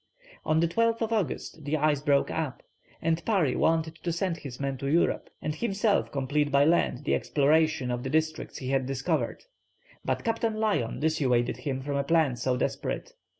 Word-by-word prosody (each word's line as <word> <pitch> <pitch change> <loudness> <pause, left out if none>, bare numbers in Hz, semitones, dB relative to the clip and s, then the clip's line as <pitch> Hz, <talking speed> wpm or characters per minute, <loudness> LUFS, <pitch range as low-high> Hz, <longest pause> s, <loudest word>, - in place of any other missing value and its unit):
On 155 0 +2
the 170 - +3
12th 230 +4 +1
August 175 - -2
the 145 +2 0
ice 150 -1 +2
broke 140 -2 +2
up, 155 -5 -3 0.4
and 165 +1 +1
Parry 185 - +2
wanted 160 0 +1
to 170 - -3
send 170 0 -1
his 140 -6 -8
men 140 -1 -2
to 140 - -3
Europe, 165 +5 +1
and 155 - -1
himself 205 +3 0
complete 145 +2 0
by 140 +1 +5
land 155 -4 +2
the - - 0
exploration 150 -2 +2
of 120 0 -2
the 130 - -4
districts 155 +2 -1
he 130 - -5
had 135 -1 +1
discovered, 135 0 -1 0.6
but - - -1
Captain 225 -1 0
Lyon 215 - 0
dissuaded 135 -6 +1
him 135 -2 -3
from 140 0 -2
a 140 - +1
plan 155 -3 +2
so 125 +1 0
desperate. - - -3
155 Hz, 180 wpm, -28 LUFS, 135-170 Hz, 0.6 s, by